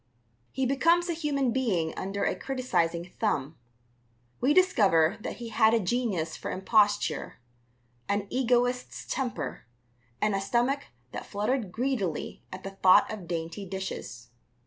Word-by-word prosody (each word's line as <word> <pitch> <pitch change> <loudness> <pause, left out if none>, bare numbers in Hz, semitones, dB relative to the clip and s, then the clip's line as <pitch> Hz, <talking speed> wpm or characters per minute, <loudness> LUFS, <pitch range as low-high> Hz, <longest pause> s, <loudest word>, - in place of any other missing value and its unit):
He 265 - -1
becomes 335 +7 +3
a - - +1
human 285 -5 0
being 200 -11 0
under 195 +1 -3
a - - +1
criticizing 175 -10 -1
thumb. 160 - 0 0.8
We 265 - +3
discover 210 - +4
that - - -4
he 235 -1 -7
had 220 0 +4
a - - +3
genius 190 -6 -1
for - - -6
imposture, 205 -4 +1 0.7
an 200 0 0
egoist's 245 0 0
temper, 255 - -3 0.5
and 210 -1 +1
a 195 - 0
stomach 245 +7 +1 0.3
that - - -6
fluttered 210 0 -1
greedily 225 - -2
at 185 0 -8
the 195 - -5
thought 190 -1 +5
of 195 -5 -8
dainty 170 +3 -4
dishes. 190 -11 -6
210 Hz, 135 wpm, -28 LUFS, 185-255 Hz, 0.8 s, thought